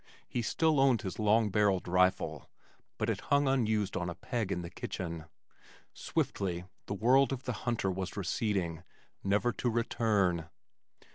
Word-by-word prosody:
He 120 - -2
still 155 +7 +2
owned 130 -5 +4
his 95 - -5
long 110 0 +3
barrelled 100 -2 +2
rifle 90 +1 +1 0.5
but - - -1
it - - -1
hung 140 0 +4
unused 110 -6 +1
on 90 -2 -1
a 85 - -5
peg 115 0 -3
in 90 - -2
the 85 - -6
kitchen. 85 -3 -5 0.7
Swiftly 90 -2 -2 0.2
the 100 - -2
world 130 +6 +4
of 135 -1 -3
the 125 - -2 0.2
hunter 110 -5 0
was 95 +1 -4
receding, 95 -4 -1 0.4
never 105 +5 +2
to 120 - -1
return. 105 -7 +1
105 Hz, 150 wpm, -31 LUFS, 90-120 Hz, 0.7 s, owned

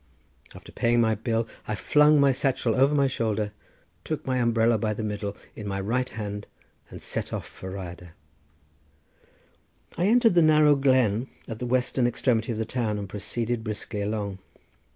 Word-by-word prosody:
After - - -12
paying 120 0 +2
my 110 -1 +3
bill 115 +1 -1 0.2
I 105 - -1
flung 150 +7 +4
my 140 -1 +5
satchel 130 -3 0
over 135 +4 +3
my 140 -1 +4
shoulder, 110 -5 -1 0.5
took 155 -2 -4
my 130 -1 0
umbrella 115 -1 +2
by 105 0 -1
the 110 - -4
middle 105 -1 -4 0.2
in 105 - -7
my 95 -1 -2
right 125 +6 -1
hand, 105 -2 -6 0.4
and - - -9
set - - -3
off - - -4
for 95 - -9
the 95 - -6
Rhyadr. 90 -2 -8 1.9
I 180 - +3
entered 230 -1 +5
the 175 - +5
narrow 155 -2 +5
glen 130 -4 +2 0.2
at 110 -1 -6
the 125 - -3
western 125 0 +1
extremity 120 -1 0
of 110 - -3
the 110 - -1
town 110 -3 -1
and 100 -1 -5
proceeded 115 +4 -3
briskly 105 -1 -4
along. 100 -2 -3
115 Hz, 170 wpm, -26 LUFS, 105-130 Hz, 1.9 s, my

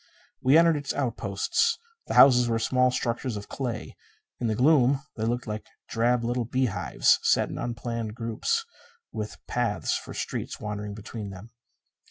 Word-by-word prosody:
We 135 +4 +5
entered 165 -2 +5
its 145 -1 -4
outposts. 135 - 0 0.3
The - - -3
houses 125 -3 +7
were 115 - +1
small 125 +2 +2
structures 125 -2 -2
of 100 - -8
clay. 125 -4 -5 0.4
In 120 - -1
the 110 - 0
gloom 135 +1 +4
they 110 - -2
looked 120 +2 -1
like 110 0 -5 0.2
drab 120 +1 +1
little 120 +1 0
beehives 130 -2 +2
set - - +2
in - - -6
unplanned 115 -2 -4
groups, 120 - -1 0.5
with 105 0 -5
paths 120 -4 -1
for - - -6
streets - - -4
wandering 105 -1 -5
between 110 0 -7
them. 100 +4 -11
120 Hz, 155 wpm, -27 LUFS, 110-130 Hz, 0.5 s, houses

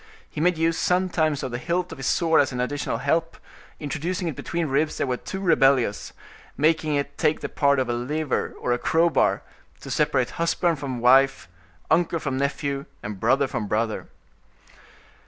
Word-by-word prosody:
He 150 - -6
made 180 0 +2
use 165 0 +1
sometimes 175 -5 +1
of 130 - -3
the 120 - -3
hilt 175 +4 -2
of 160 - -9
his 135 - -3
sword 165 -2 +3
as 140 - -1
an 125 - -4
additional 125 -2 -2
help: 160 +6 -1 0.4
introducing 165 +5 -3
it 160 - -3
between 170 +5 -3
ribs 150 +2 0
that - - 0
were 130 -2 -1
too 190 - -6
rebellious, 135 - +2 0.5
making 155 +1 +2
it 140 0 -3
take 150 - +1
the - - -3
part 140 -1 +2
of 130 -1 0
a 120 - -1
lever 145 +5 -2
or 120 - 0
crowbar, 165 0 +2 0.4
to - - -8
separate 130 -1 +1
husband 170 -1 +1
from 130 -4 -4
wife, 135 +2 +4 0.4
uncle 170 +1 +2
from 135 -4 -3
nephew, 140 0 -2 0.2
and 105 -2 -6
brother 135 +6 +3
from 115 -5 -4
brother. 110 +1 -1
145 Hz, 175 wpm, -24 LUFS, 130-165 Hz, 0.5 s, wife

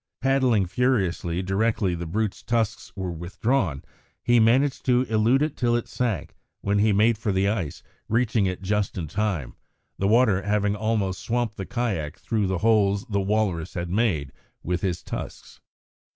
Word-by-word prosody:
Paddling 130 -7 +2
furiously 95 -6 0
directly 100 0 +1
the 85 0 -4
brute's 105 +4 -2
tusks 115 -2 -1
were 95 -2 -3
withdrawn, 85 - -1 0.4
he 120 0 +4
managed 130 +5 +3
to 125 0 +4
elude 115 +4 +2
it 150 -1 -2
till 120 -1 +1
it 120 - -2
sank, 115 -10 -2 0.3
when 100 0 +1
he 105 +1 +4
made 105 +2 +3
for 110 -2 -1
the 95 +1 +1
ice, 100 -8 -2 0.3
reaching 115 -3 +2
it 90 0 -4
just 105 0 -1
in 85 -3 -3
time, 95 - -2 0.5
the 100 - +1
water 110 -3 +4
having 105 +1 +1
almost 105 -3 -1
swamped 120 -2 -1
the 95 - -6
kayak 100 - -2
through 110 -4 -1
the 95 0 0
holes 100 -1 +3
the 100 -1 +1
walrus 95 -4 -1
had 85 0 -3
made 90 - 0 0.3
with 90 +1 -1
his 90 -3 -2
tusks. - - -7
105 Hz, 165 wpm, -25 LUFS, 95-115 Hz, 0.5 s, he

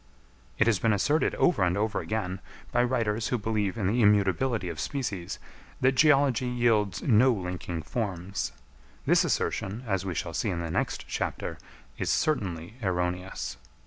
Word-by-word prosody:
It - - +4
has 115 -4 +3
been 115 -2 +3
asserted 145 +10 +2
over 175 - +3
and 90 0 +2
over 105 +1 0
again, 95 -4 -3 0.3
by 120 - +3
writers 115 -3 0
who 125 - 0
believe 105 -2 -1
in 105 - -1
the 115 +6 +2
immutability 105 +2 +3
of 85 -3 -5
species, 105 - -3 0.4
that 130 - +4
geology 135 -3 +4
yields 115 -6 +1
no 125 +2 +5
linking 90 -5 -4
forms. 100 -4 -3 0.5
This - - +5
assertion, 105 +6 -1
as 95 -4 0
we 95 -3 -3
shall - - -3
see - - -1
in 85 - -2
the 85 -1 -3
next - - -2
chapter, - - -3 0.4
is - - -1
certainly 95 - -1
erroneous. 90 - -2
105 Hz, 155 wpm, -28 LUFS, 90-120 Hz, 0.5 s, no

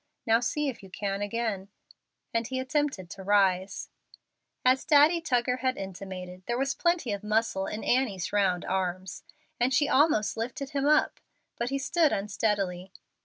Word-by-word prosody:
Now 225 -1 +4
see 295 +5 -1
if 265 - -4
you 195 - -12
can 195 +1 -3
again;" 205 -2 -2 0.7
and 230 0 0
he 260 0 -3
attempted 265 - -1
to 195 - -8
rise. 190 -1 +2 0.8
As 255 +1 +4
Daddy 305 +3 +5
Tuggar 250 -4 +1
had 255 0 -1
intimated, 185 -1 -7
there 240 0 0
was 270 +1 0
plenty 340 -9 0
of 200 0 -5
muscle 215 -2 0
in 210 - -5
Annie's 215 -10 0
round 190 -4 +2
arms, 185 0 -2 0.4
and 245 +2 +2
she 285 +2 +3
almost 270 -7 +3
lifted 260 +5 -4
him 280 -1 0
up, 305 0 +3 0.4
but 235 +1 -2
he 275 - -1
stood 305 +3 +2
unsteadily. 195 -3 -1
225 Hz, 160 wpm, -28 LUFS, 195-270 Hz, 0.8 s, Daddy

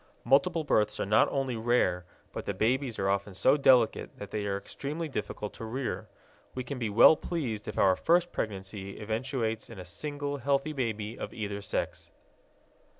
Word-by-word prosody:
Multiple 155 +7 +3
births 105 -7 +1
are - - 0
not 105 +2 +4
only 135 -3 -1
rare, 110 -6 +1 0.3
but - - -5
the 100 - -1
babies 120 +3 0
are 95 - 0
often 100 0 -1
so 130 +8 +4
delicate 130 -5 +3
that 100 - -8
they 105 -1 -2
are 100 0 0
extremely 145 +10 -5
difficult 105 -5 -4
to - - -9
rear. 120 +4 -3 0.5
We 130 - -3
can 135 0 -5
be 115 -3 -1
well 110 +9 +8
pleased 130 -12 -3
if 105 - -5
our 95 -1 +5
first 175 - +2
pregnancy 100 -1 -5
eventuates 110 +1 -2
in - - -10
a 90 - -8
single 145 - -4
healthy 140 +3 0
baby 110 -4 -3
of - - -6
either 100 -2 -4
sex. 100 - -3
115 Hz, 175 wpm, -29 LUFS, 105-140 Hz, 0.5 s, well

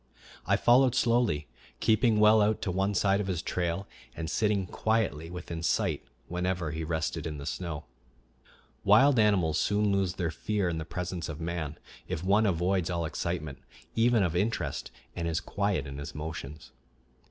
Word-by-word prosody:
I - - +4
followed 125 +1 +5
slowly, 115 - +2 0.3
keeping 110 0 +3
well 105 +1 +6
out 105 +1 +2
to 95 - -1
one 95 +2 0
side 100 +1 +3
of 100 - -4
his 90 -3 -2
trail, 90 +2 -2 0.3
and 80 0 -4
sitting 105 -3 +1
quietly 100 -5 -1
within 85 -2 -6
sight 80 - 0 0.2
whenever 90 -2 -2
he 80 +2 -4
rested 80 0 -2
in 75 -1 -5
the 70 - -7
snow. 85 -4 -4 1.0
Wild 115 +6 +6
animals 95 -7 +3
soon 105 0 +2
lose 95 -2 +1
their 85 -3 -1
fear 100 +3 -1
in 80 -1 -2
the 80 - -5
presence 90 -1 -4
of 80 -1 -6
man 80 -3 -3 0.3
if 90 -2 -3
one 105 +3 +3
avoids 90 0 +1
all 85 -2 -1
excitement, 80 -3 -3 0.4
even 115 -2 +4
of 90 -2 0
interest, 105 +6 -1 0.3
and 85 - -2
is 80 -1 0
quiet 100 -8 -1
in 70 0 -7
his 70 - -7
motions. 75 -1 -7
90 Hz, 165 wpm, -29 LUFS, 80-105 Hz, 1.0 s, well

